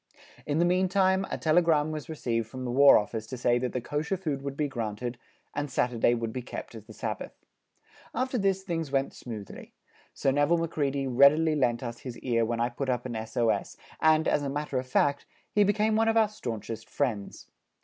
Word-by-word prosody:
In 145 0 0
the 170 - +4
meantime 190 +1 +2
a - - -3
telegram 155 -2 +3
was 155 +1 -6
received 115 -7 -2
from 130 +3 -7
the 120 - -2
War 140 +3 +7
Office 110 +1 -3
to 130 - -6
say 120 0 +2
that 125 0 -2
the 125 - -2
Kosher 150 +9 -2
food 150 -7 -3
would 140 0 -5
be 150 - +1
granted, 120 -1 -4 0.3
and 145 0 -3
Saturday 120 -1 +2
would 115 -1 -3
be 130 - -3
kept 120 - -8
as 110 -2 -10
the - - -13
Sabbath. - - -5 0.8
After 255 +1 0
this 195 -1 +1
things 165 -5 -3
went 135 0 0
smoothly; 110 -5 -9 0.4
Sir 135 - 0
Nevil 145 +5 +3
Macready 145 -4 -1
readily 140 +5 +5
lent 120 -4 +1
us 120 -1 -5
his 125 -3 -7
ear 115 -2 +1
when 115 +1 -1
I 120 +1 +1
put 130 +2 -4
up 125 -1 -1
an 120 -2 -4
S.O.S., 115 +1 -1 0.2
and, 155 0 +4
as - - +2
a 140 - -2
matter 145 -1 -2
of 130 - -6
fact, 140 +2 +1 0.2
he 210 - +4
became 215 +2 +2
one 225 +1 +3
of 225 0 +3
our 220 -2 +4
staunchest 115 - -6
friends. 115 -8 -3
140 Hz, 200 wpm, -28 LUFS, 120-160 Hz, 0.8 s, War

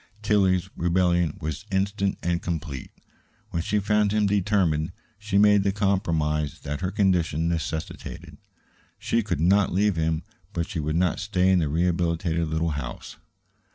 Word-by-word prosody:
Tillie's 95 -3 +2
rebellion 85 -2 +1
was 75 +3 -4
instant 100 0 0
and 85 0 0
complete. 80 -6 -4 0.6
When 85 - -1
she 105 +5 0
found 105 0 +2
him 105 0 +2
determined, 95 -5 +1 0.3
she 105 -1 -1
made 105 0 +6
the 100 0 +1
compromise 80 -7 0
that 75 +3 -4
her 90 - 0
condition 90 -5 +1
necessitated. 80 -1 -4 0.6
She 115 - 0
could 105 -9 -2
not 95 +3 +3
leave 100 0 +2
him, 80 0 0 0.3
but 85 0 -2
she 95 -6 -4
would 75 +1 -1
not 90 0 +1
stay 95 0 +2
in 95 - +4
the 80 -4 0
rehabilitated 85 0 0
little 80 +1 0
house. 70 -5 -6
90 Hz, 150 wpm, -25 LUFS, 80-100 Hz, 0.6 s, made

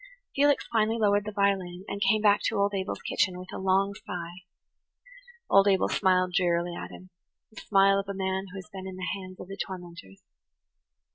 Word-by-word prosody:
Felix 285 +1 +3
finally 220 0 +2
lowered 205 -2 +2
the 215 - -4
violin, 195 -3 0
and 200 0 -5
came 210 +2 +3
back 205 -1 +5
to 225 - -1
old 200 0 +1
Abel's 190 0 -3
kitchen 185 -2 0
with 185 0 -10
a - - -5
long 195 +1 +2
sigh. 180 -3 -7 1.1
Old 195 0 +5
Abel 195 -1 +3
smiled 185 -2 +2
drearily 175 -1 +1
at - - -6
him–the 185 +4 -15
smile 195 -1 +4
of 200 0 -5
a 200 - -3
man 190 0 -2
who 190 - -9
has 185 - -8
been 190 -1 -7
in 190 - -7
the 185 0 -5
hands 185 -1 -10
of - - -8
the 195 +1 -8
tormentors. 175 - -8
190 Hz, 190 wpm, -27 LUFS, 185-200 Hz, 1.1 s, back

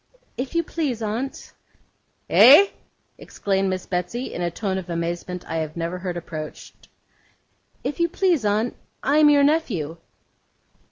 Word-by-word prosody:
'If 255 +5 -5
you 335 - +2
please, 280 -9 -3
aunt.' 230 +6 -4 0.7
'EH?' 300 +11 +8 0.5
exclaimed 195 -1 -1
Miss 185 -1 -3
Betsey, 185 +8 -3
in - - -4
a 175 - 0
tone 190 +2 -3
of 180 -1 -10
amazement 170 +1 -4
I 165 - -3
have 155 0 -4
never 170 +2 -3
heard 180 -1 -4
approached. 155 -3 -8 1.0
'If 295 - -4
you 340 0 +2
please, 345 - +1
aunt, 215 +3 0 0.3
I 285 +3 +3
am 300 -1 +7
your 285 -1 +5
nephew. 220 - 0
205 Hz, 145 wpm, -23 LUFS, 175-280 Hz, 1.0 s, EH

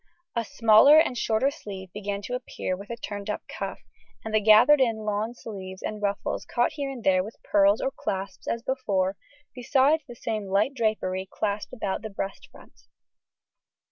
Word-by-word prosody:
A 235 - +1
smaller 230 +7 +6
and 315 -5 +4
shorter 235 +4 +1
sleeve 190 -8 -9
began 205 0 -4
to 245 - -5
appear 250 -6 -3
with 200 +2 -11
a 235 - -3
turned 205 -2 -6
up 210 - -3
cuff, - - -6 0.4
and 220 - -5
the 215 - +5
gathered 220 +7 +7
in 225 -4 +1
lawn 215 +3 -2
sleeves 190 -5 -8
and 215 -1 -4
ruffles 200 -1 -2
caught 240 0 0
here 285 -2 -4
and 260 -4 -7
there 185 -1 +3
with 215 +3 -9
pearls 200 +1 +3
or 270 - 0
clasps 195 -7 -5
as 230 0 -2
before, 200 -8 0 0.4
besides 270 +5 +2
the 240 - -9
same 215 -3 -3
light 200 +8 +1
drapery 195 -6 -1
clasped 205 -1 -2
about 200 -7 -3
the 220 - -6
breast 195 -1 -6
front. - - -19
215 Hz, 175 wpm, -26 LUFS, 200-245 Hz, 0.4 s, gathered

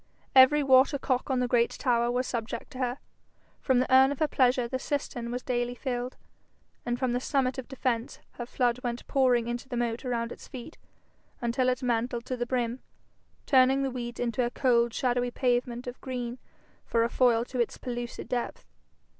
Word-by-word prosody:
Every 270 +3 +7
water 265 +2 +5
cock 260 -1 -1
on 260 -2 +1
the 250 - +1
great 235 -1 +3
tower 240 -3 +1
was 250 +1 0
subject 230 -3 -4
to 255 - -9
her. 250 0 -1 0.6
From 260 -2 +2
the 255 +1 +1
urn 265 +1 +7
of 285 - -3
her 310 - +2
pleasure 250 -3 +2
the 260 +2 -3
cistern 255 -4 -3
was 245 +1 -4
daily 245 -1 -1
filled, 245 0 -4 0.7
and 240 0 0
from 255 -1 0
the 245 - +1
summit 265 0 0
of 255 - -7
defence 250 -3 -2
her 240 - -7
flood 245 -1 0
went 240 -1 -3
pouring 250 -4 +2
into 240 +2 -4
the 245 - -3
moat 235 0 -1
around 235 -2 -2
its - - -10
feet, 265 +4 -10 0.6
until 250 +2 +1
it 255 0 -1
mantled 240 0 -1
to 255 - -3
the 240 -1 -3
brim, 245 -1 -1 0.7
turning 265 0 +4
the 270 - -1
weeds 240 -1 -5
into 245 +1 0
a 240 - 0
cold 240 -2 +2
shadowy 245 0 0
pavement 245 -1 -1
of 245 0 -7
green 250 -2 -4 0.4
for 230 -1 +1
a - - +2
foil 240 -2 +3
to 255 0 -5
its 235 - 0
pellucid 240 -1 -5
depth. 245 -1 -3
245 Hz, 190 wpm, -28 LUFS, 240-260 Hz, 0.7 s, Every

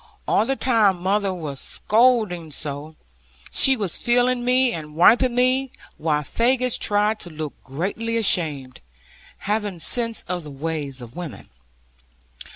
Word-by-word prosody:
All 220 - +2
the 270 - 0
time 220 -9 +2
mother 200 +1 +1
was 155 -7 -6
scolding 215 -8 +1
so, 145 +2 -5 0.6
she 265 -1 +4
was 200 -6 +2
feeling 245 +1 +1
me, 250 0 +3
and 150 -2 -7
wiping 240 +8 +4
me; 255 +2 +2 0.3
while 150 -2 0
Faggus 250 - +1
tried 210 +1 +1
to 175 - -7
look 155 -2 -6
greatly 200 +11 -3
ashamed, 150 - 0 0.6
having 205 -2 -1
sense 230 +7 +1
of 180 -1 -3
the 150 - -9
ways 145 -2 -5
of 120 0 -11
women. 160 - -8
195 Hz, 135 wpm, -22 LUFS, 155-240 Hz, 0.6 s, she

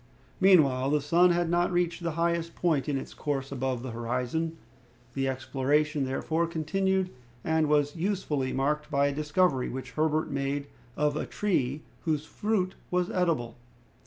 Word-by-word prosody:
Meanwhile, 140 -9 +5
the 150 +1 +3
sun 170 +5 +4
had 175 0 +2
not 175 +2 +2
reached 175 0 0
the 170 -2 -2
highest 170 0 0
point 155 -6 +1
in 140 - +1
its - - -7
course 140 -2 -3
above 130 -2 -2
the 130 - -5
horizon. 125 +8 -2 0.6
The 135 0 0
exploration, 140 +3 0
therefore, 160 +5 0
continued, 185 +3 0 0.3
and 160 -1 +1
was 145 -1 +2
usefully 165 -7 -1
marked 150 +3 0
by 140 0 +2
a - - -3
discovery 150 -2 +1
which 130 -1 -6
Herbert 155 +2 0
made 140 +1 -1 0.3
of 150 0 +1
a 155 - -2
tree 150 -8 -1 0.2
whose 155 -3 -1
fruit 195 0 -1 0.2
was 180 0 0
edible. 155 -11 0
150 Hz, 155 wpm, -28 LUFS, 135-170 Hz, 0.6 s, Meanwhile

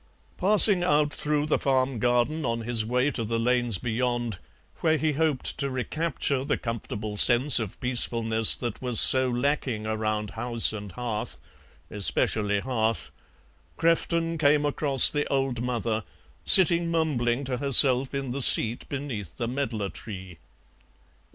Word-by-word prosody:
Passing 200 -1 +6
out 150 -4 0
through 150 +1 -3
the 155 - -1
farm 130 -2 -2
garden 125 +7 -1
on 115 -2 -3
his 115 -1 -1
way 125 +5 -1
to 115 - -6
the 115 +1 -4
lanes 120 -2 0
beyond, 120 -2 -4 0.4
where 160 -1 0
he 155 0 -2
hoped 150 -2 -1
to 140 -1 -1
recapture 135 +1 -3
the - - -3
comfortable 110 -3 -7
sense 125 +5 +5
of 110 -4 -7
peacefulness 115 -3 +3
that 120 -3 -7
was 125 -3 0
so 130 -1 +4
lacking 125 -3 -3
around 110 -1 -4
house 115 +1 +2
and 105 -2 -9
hearth 115 -2 -6 0.5
especially 105 0 -1
hearth 115 -3 -3 0.7
Crefton 165 0 -1
came 150 0 +1
across 140 -2 +3
the 145 0 -3
old 135 -4 -3
mother, 115 -3 -4 0.4
sitting 170 -2 +6
mumbling 140 -6 -2
to 130 -2 -5
herself 135 0 +4
in 135 -2 -5
the 140 +2 -5
seat 115 -1 +3
beneath 125 - -7
the 120 - -4
medlar 120 -6 -4
tree. 95 -6 -11
125 Hz, 140 wpm, -24 LUFS, 115-145 Hz, 0.7 s, Passing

